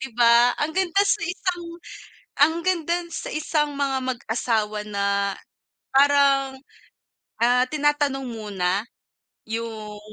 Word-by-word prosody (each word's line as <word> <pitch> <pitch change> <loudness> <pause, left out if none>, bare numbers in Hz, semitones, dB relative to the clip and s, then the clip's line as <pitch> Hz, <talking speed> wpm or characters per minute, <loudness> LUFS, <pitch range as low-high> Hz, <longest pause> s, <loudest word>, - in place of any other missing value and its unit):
'di 265 - -5
ba? 235 0 +5
Ang 300 +2 -1
ganda 380 +2 +2
sa 400 - +1
isang 355 0 -3 0.7
ang 300 +3 +5
ganda 340 -2 0
sa 335 - -6
isang 300 -1 0
mga 280 -1 -1
mag-asawa 225 -2 -2
na 200 -1 0 0.6
parang, 275 -1 +3 0.8
ah, 245 +1 +4
tinatanong 290 -2 0
muna 205 -3 -2 0.6
yung 220 -2 -5
265 Hz, 105 wpm, -23 LUFS, 225-300 Hz, 0.8 s, ba